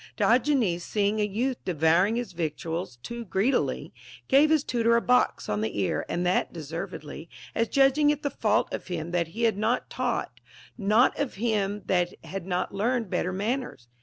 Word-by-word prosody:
Dio 240 Hz, +2 st, +4 dB
genes, 230 Hz, -12 st, +1 dB
seeing 210 Hz, +2 st, 0 dB
a -, -, +3 dB
youth 235 Hz, +6 st, -2 dB
devouring 175 Hz, +5 st, +2 dB
his 240 Hz, 0 st, -3 dB
victuals 165 Hz, -2 st, -3 dB
too 235 Hz, 0 st, -6 dB
greedily, 205 Hz, +6 st, 0 dB, 0.3 s
gave 285 Hz, +3 st, +5 dB
his 310 Hz, -2 st, +3 dB
tutor 235 Hz, -3 st, +2 dB
a -, -, +5 dB
box 250 Hz, +1 st, +2 dB
on 105 Hz, 0 st, -1 dB
the 110 Hz, -, -3 dB
ear, 95 Hz, -, -1 dB
and 175 Hz, +1 st, -1 dB
that 180 Hz, -, +1 dB
deservedly, 165 Hz, 0 st, -7 dB, 0.2 s
as 230 Hz, -, +1 dB
judging 275 Hz, +3 st, +4 dB
it 295 Hz, 0 st, 0 dB
the 285 Hz, -, -1 dB
fault 215 Hz, -2 st, +1 dB
of -, -, -5 dB
him 170 Hz, -2 st, -4 dB
that 175 Hz, -2 st, 0 dB
had 220 Hz, +3 st, 0 dB
not 230 Hz, +4 st, 0 dB
taught, -, -, -2 dB, 0.4 s
not 215 Hz, +3 st, +3 dB
of 285 Hz, -3 st, -2 dB
him 210 Hz, -2 st, -1 dB
that 175 Hz, -1 st, +1 dB
had 190 Hz, -1 st, -6 dB
not 180 Hz, 0 st, -1 dB
learned 225 Hz, +1 st, -1 dB
better 180 Hz, -, 0 dB
manners. 210 Hz, -, -3 dB
205 Hz, 175 wpm, -27 LUFS, 175-240 Hz, 0.4 s, gave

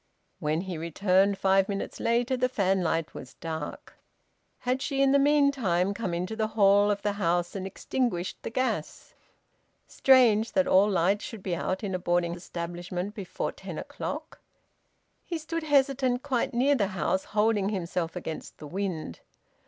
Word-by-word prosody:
When 155 Hz, +2 st, 0 dB
he 180 Hz, -4 st, -5 dB
returned, 190 Hz, +4 st, +2 dB
five 195 Hz, 0 st, +3 dB
minutes 200 Hz, -1 st, -4 dB
later, 240 Hz, +2 st, +1 dB
the 255 Hz, 0 st, +1 dB
fanlight 185 Hz, -7 st, 0 dB
was 125 Hz, -, -10 dB
dark. 160 Hz, -2 st, -6 dB, 0.7 s
Had 255 Hz, +1 st, 0 dB
she, 275 Hz, -1 st, -2 dB
in 275 Hz, 0 st, +4 dB
the 280 Hz, -, +5 dB
meantime, 275 Hz, -11 st, +3 dB
come 200 Hz, -3 st, -3 dB
into 180 Hz, +5 st, -3 dB
the 220 Hz, -1 st, 0 dB
hall 200 Hz, 0 st, +5 dB
of 205 Hz, -1 st, -1 dB
the 205 Hz, -, +1 dB
house 175 Hz, +1 st, +1 dB
and 190 Hz, -1 st, -3 dB
extinguished 195 Hz, -3 st, -2 dB
the -, -, -4 dB
gas? 255 Hz, +3 st, -3 dB, 0.7 s
Strange, 235 Hz, -5 st, +4 dB
that 280 Hz, -1 st, +3 dB
all 195 Hz, +3 st, +5 dB
lights 195 Hz, +2 st, +2 dB
should 220 Hz, -5 st, -8 dB
be 180 Hz, -3 st, -1 dB
out 185 Hz, +4 st, -2 dB
in 195 Hz, -2 st, -2 dB
a 185 Hz, -, -1 dB
boarding 175 Hz, -1 st, +1 dB
establishment 175 Hz, +2 st, -5 dB
before 200 Hz, -5 st, -4 dB
ten -, -, -8 dB
o'clock! -, -, -6 dB, 0.8 s
He 340 Hz, -, -4 dB
stood 330 Hz, +1 st, -4 dB
hesitant 270 Hz, -4 st, +2 dB
quite 260 Hz, -4 st, 0 dB
near 260 Hz, +4 st, +3 dB
the 215 Hz, -8 st, +1 dB
house, 190 Hz, +2 st, 0 dB
holding 210 Hz, -2 st, +1 dB
himself 175 Hz, -4 st, -3 dB
against 160 Hz, -, -6 dB
the -, -, -10 dB
wind. 170 Hz, -, -4 dB
200 Hz, 160 wpm, -28 LUFS, 175-245 Hz, 0.8 s, the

